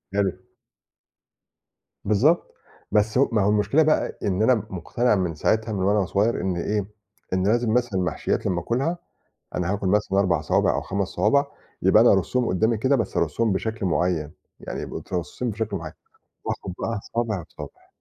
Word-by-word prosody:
حلو. 100 Hz, -2 st, +2 dB, 1.7 s
بالضبط. 125 Hz, -, +2 dB, 0.4 s
بس 105 Hz, +2 st, +2 dB
ه 135 Hz, -, +4 dB
ما 110 Hz, -2 st, +2 dB
هو 100 Hz, -, +3 dB
المشكلة 105 Hz, +9 st, +3 dB
بقى 155 Hz, 0 st, +1 dB
إن 95 Hz, -1 st, 0 dB
أنا 125 Hz, +3 st, +5 dB
مٌقتنع 105 Hz, +6 st, 0 dB
من 90 Hz, -5 st, -1 dB
ساعتها 110 Hz, +7 st, 0 dB
من 95 Hz, -2 st, -1 dB
وأنا 100 Hz, 0 st, +2 dB
صغير 105 Hz, +6 st, +1 dB
إن 95 Hz, 0 st, -1 dB
إيه، 100 Hz, +3 st, -1 dB, 0.5 s
إن 95 Hz, +1 st, +1 dB
لازم 115 Hz, 0 st, +2 dB
مثلًا 120 Hz, -6 st, +1 dB
المحشيّات 90 Hz, -, -1 dB
لمّا 90 Hz, -, 0 dB
آكُلها، 135 Hz, -, -1 dB, 0.6 s
أنا 90 Hz, +1 st, -1 dB
هاكُل 100 Hz, -2 st, -1 dB
مثلًا 100 Hz, -1 st, +1 dB
4 90 Hz, -5 st, +2 dB
صوابع 75 Hz, -, +2 dB
أو -, -, 0 dB
5 100 Hz, -1 st, -2 dB
صوابع، 110 Hz, +10 st, +2 dB, 0.4 s
يبقى -, -, +6 dB
أنا -, -, +6 dB
أرصّهم 125 Hz, -1 st, +1 dB
قُدّامي 110 Hz, +6 st, +1 dB
كده، 130 Hz, +5 st, +2 dB
بس 115 Hz, -, -3 dB
أرصّمهم 90 Hz, +8 st, +1 dB
بشكل 110 Hz, +1 st, -2 dB
معيّن. 85 Hz, -2 st, 0 dB, 0.3 s
يعني -, -, -6 dB
يبقى -, -, -5 dB
مترصّصين 95 Hz, +7 st, -4 dB
بشكل 105 Hz, -1 st, -3 dB
معيّن. 80 Hz, -3 st, -6 dB, 0.5 s
وآخُد 90 Hz, -, -4 dB
بقى 115 Hz, -2 st, -2 dB, 0.2 s
صابع، 110 Hz, -6 st, -1 dB
صابع. -, -, -11 dB
105 Hz, 165 wpm, -24 LUFS, 95-115 Hz, 1.7 s, يبقى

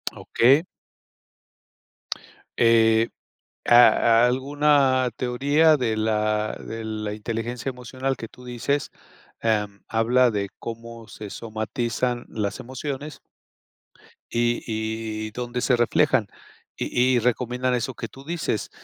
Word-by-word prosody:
Okey. 135 Hz, +8 st, +3 dB, 1.9 s
Eh, 115 Hz, -1 st, +4 dB, 0.6 s
a 120 Hz, -1 st, +6 dB
alguna 135 Hz, 0 st, +2 dB
teoría 145 Hz, +6 st, +3 dB
de 115 Hz, -5 st, -1 dB
la 110 Hz, -1 st, 0 dB
de 115 Hz, 0 st, -6 dB
la 110 Hz, -1 st, -4 dB
inteligencia 115 Hz, +3 st, -4 dB
emocional 130 Hz, +1 st, -3 dB
que 115 Hz, -1 st, -7 dB
tú 125 Hz, -, -16 dB
dices, 125 Hz, +4 st, -2 dB, 0.5 s
em, 105 Hz, -3 st, -1 dB
habla 120 Hz, +3 st, +3 dB
de 100 Hz, -2 st, -2 dB
cómo 115 Hz, -1 st, -8 dB
se 105 Hz, -1 st, -9 dB
somatizan 120 Hz, +3 st, -3 dB
las 105 Hz, -2 st, -3 dB
emociones 135 Hz, +3 st, -6 dB, 1.1 s
y 120 Hz, 0 st, 0 dB
y 110 Hz, -1 st, -3 dB
donde 125 Hz, +1 st, -4 dB
se 125 Hz, -, +3 dB
reflejan, 120 Hz, -1 st, +2 dB, 0.5 s
y 125 Hz, +1 st, +2 dB
y -, -, +3 dB
recomiendan 125 Hz, +1 st, 0 dB
eso 125 Hz, +2 st, -2 dB
que 115 Hz, -, -6 dB
tú 135 Hz, +5 st, -14 dB
dices, 160 Hz, -9 st, -2 dB
120 Hz, 110 wpm, -24 LUFS, 110-130 Hz, 1.9 s, a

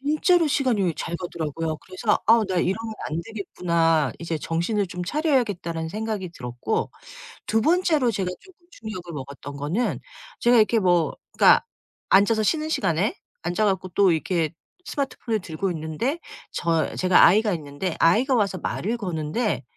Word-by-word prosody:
진짜로 310 Hz, +4 st, +3 dB
시간이 240 Hz, -, +1 dB
잘 170 Hz, -, -3 dB
가더라고요. 165 Hz, -2 st, -4 dB
그래서 195 Hz, +3 st, -1 dB
'아 225 Hz, 0 st, +6 dB
나 185 Hz, -, -1 dB
이러면 220 Hz, +6 st, -1 dB
안 160 Hz, +2 st, -2 dB
되겠구나. 170 Hz, -, 0 dB
이제 165 Hz, -1 st, -3 dB
정신을 175 Hz, +7 st, -1 dB
좀 180 Hz, +1 st, -5 dB
차려야겠다.'라는 205 Hz, -, 0 dB
생각이 210 Hz, -2 st, -4 dB
들었고. 125 Hz, -, -3 dB, 0.6 s
2 225 Hz, 0 st, +1 dB
번째로 315 Hz, -5 st, +3 dB
제가 190 Hz, -3 st, -2 dB
쪼금 355 Hz, -2 st, -21 dB
충격을 185 Hz, -6 st, -8 dB
먹었던 140 Hz, 0 st, -8 dB
거는 155 Hz, +12 st, -1 dB, 0.4 s
제가 240 Hz, 0 st, +4 dB
이렇게 225 Hz, +1 st, +4 dB
뭐 175 Hz, -4 st, +2 dB, 0.2 s
그러니까 -, -, +6 dB, 0.5 s
앉아서 215 Hz, +3 st, +4 dB
쉬는 310 Hz, +6 st, 0 dB
시간에 185 Hz, -, 0 dB, 0.3 s
앉아 175 Hz, +6 st, 0 dB
갖고 190 Hz, -2 st, 0 dB
또 190 Hz, 0 st, +4 dB
이렇게 165 Hz, 0 st, 0 dB, 0.3 s
스마트폰을 255 Hz, -5 st, -2 dB
들고 180 Hz, +2 st, -3 dB
있는데 160 Hz, -, -2 dB, 0.3 s
저 165 Hz, -2 st, 0 dB
제가 185 Hz, -1 st, +5 dB
아이가 210 Hz, +3 st, +4 dB
있는데 155 Hz, +2 st, -4 dB
아이가 240 Hz, -, +4 dB
와서 200 Hz, -4 st, +1 dB
말을 215 Hz, +6 st, -2 dB
거는데 180 Hz, -, -2 dB
190 Hz, 345 characters per minute, -24 LUFS, 165-225 Hz, 0.6 s, 아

